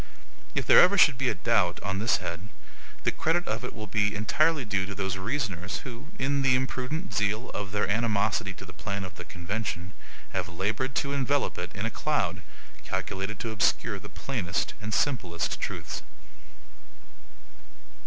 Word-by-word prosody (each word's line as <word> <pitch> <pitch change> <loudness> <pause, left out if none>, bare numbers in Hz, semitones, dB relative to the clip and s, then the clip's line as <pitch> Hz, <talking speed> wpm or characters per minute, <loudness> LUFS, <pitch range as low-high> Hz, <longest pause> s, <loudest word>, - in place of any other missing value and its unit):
If - - +1
there - - +9
ever 200 +3 +6
should 145 -8 +6
be 130 -2 +2
a - - 0
doubt 100 -7 +2
on 95 0 -1
this 115 +3 +3
head, 85 +4 -5 0.6
the - - +3
credit 175 +2 +1
of 115 +3 -2
it 125 - -3
will 110 - -6
be 105 0 +1
entirely 145 +7 +2
due 100 -3 0
to 100 - -5
those 95 -1 -1
reasoners 95 - -2
who, 125 +2 -8
in 140 +1 +1
the 130 -1 +5
imprudent 130 +6 -2
zeal 105 +3 0
of 100 -2 -4
their 105 0 +1
animosity 105 -1 +1
to 95 - -9
the 90 - -11
plan 100 +2 -3
of 95 -2 -6
the - - -8
convention, 95 0 -4 0.4
have 95 -2 -1
labored 110 +9 -1
to 140 -1 0
envelop 140 -3 +1
it 90 - -4
in 100 +2 -2
a 115 - -1
cloud 95 - 0 0.4
calculated 95 +2 -3
to 115 - -2
obscure 110 -1 +2
the 105 +1 -10
plainest 95 -5 -2
and 105 +1 -4
simplest 95 - 0
truths. - - -3
105 Hz, 170 wpm, -28 LUFS, 95-130 Hz, 0.6 s, there